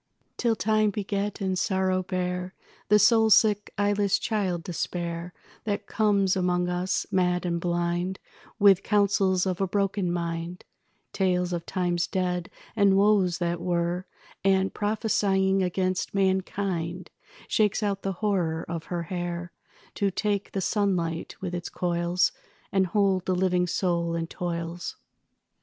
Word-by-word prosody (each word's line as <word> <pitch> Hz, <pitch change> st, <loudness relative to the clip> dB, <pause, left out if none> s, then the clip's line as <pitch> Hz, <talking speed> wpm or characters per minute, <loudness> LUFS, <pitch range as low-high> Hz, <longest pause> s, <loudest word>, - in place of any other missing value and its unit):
Till 235 Hz, -2 st, +1 dB
time 215 Hz, 0 st, +2 dB
beget 205 Hz, +1 st, -3 dB
and 190 Hz, -1 st, 0 dB
sorrow 190 Hz, -1 st, +1 dB
bear 180 Hz, 0 st, -3 dB, 0.3 s
The 210 Hz, -, +7 dB
soul 225 Hz, +1 st, +5 dB
sick 210 Hz, -1 st, +4 dB
eyeless 205 Hz, -1 st, +2 dB
child 190 Hz, -6 st, -1 dB
despair, 170 Hz, -1 st, -4 dB, 0.3 s
That 205 Hz, -2 st, -2 dB
comes 200 Hz, -3 st, +2 dB
among 180 Hz, -1 st, +1 dB
us, 180 Hz, +1 st, -1 dB
mad 180 Hz, -1 st, +1 dB
and 170 Hz, -1 st, -1 dB
blind, 175 Hz, +1 st, -1 dB, 0.4 s
With 200 Hz, -3 st, +6 dB
counsels 200 Hz, -3 st, +2 dB
of 185 Hz, 0 st, -2 dB
a 195 Hz, -, +2 dB
broken 195 Hz, -1 st, 0 dB
mind, 170 Hz, 0 st, -4 dB, 0.5 s
Tales 180 Hz, -2 st, +1 dB
of 170 Hz, -1 st, -4 dB
times 175 Hz, -2 st, 0 dB
dead 180 Hz, -1 st, -1 dB, 0.3 s
and 200 Hz, -3 st, +4 dB
woes 195 Hz, -4 st, +3 dB
that 170 Hz, -1 st, -2 dB
were, 175 Hz, +1 st, -1 dB, 0.4 s
And, 190 Hz, 0 st, +2 dB
prophesying 200 Hz, -2 st, +1 dB
against 185 Hz, +1 st, -1 dB
mankind, 190 Hz, -2 st, -1 dB, 0.4 s
Shakes 215 Hz, 0 st, +1 dB
out 200 Hz, -1 st, -1 dB
the 195 Hz, -, -2 dB
horror 170 Hz, -6 st, 0 dB
of 165 Hz, -1 st, -5 dB
her 175 Hz, -1 st, -3 dB
hair 175 Hz, 0 st, -4 dB, 0.4 s
To 200 Hz, -, +1 dB
take 200 Hz, +1 st, -2 dB
the 195 Hz, -, -1 dB
sunlight 180 Hz, -5 st, -1 dB
with 180 Hz, -2 st, -4 dB
its 175 Hz, -1 st, -4 dB
coils 175 Hz, +3 st, +1 dB, 0.4 s
And 190 Hz, -2 st, +2 dB
hold 190 Hz, 0 st, +1 dB
the 185 Hz, -, +2 dB
living 180 Hz, -1 st, +1 dB
soul 170 Hz, -1 st, 0 dB
in 165 Hz, 0 st, -1 dB
toils. 170 Hz, 0 st, -4 dB
185 Hz, 135 wpm, -26 LUFS, 175-200 Hz, 0.5 s, The